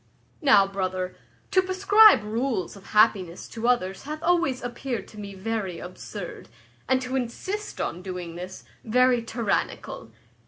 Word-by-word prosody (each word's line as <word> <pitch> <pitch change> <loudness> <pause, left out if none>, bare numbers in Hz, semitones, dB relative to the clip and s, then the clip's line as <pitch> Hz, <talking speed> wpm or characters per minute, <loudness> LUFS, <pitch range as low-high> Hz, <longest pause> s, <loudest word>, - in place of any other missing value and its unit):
"Now, 215 -10 +6
brother, 185 -2 -3 0.4
to 375 - +5
prescribe 395 - +6
rules 225 -3 -2
of 195 - -14
happiness 205 -5 +2
to 230 +1 -3
others 195 -6 +1
hath 305 +2 -6
always 335 -8 +2
appeared 240 -3 -4
to 210 - -12
me 200 -1 -7
very 195 -3 -3
absurd, 180 - -8 0.4
and 260 0 +4
to 255 +1 -3
insist 370 - -4
on 175 - -3
doing 180 -2 -6
this, 180 +2 -8 0.2
very 250 +1 +3
tyrannical. 230 -3 -2
225 Hz, 135 wpm, -26 LUFS, 190-260 Hz, 0.4 s, Now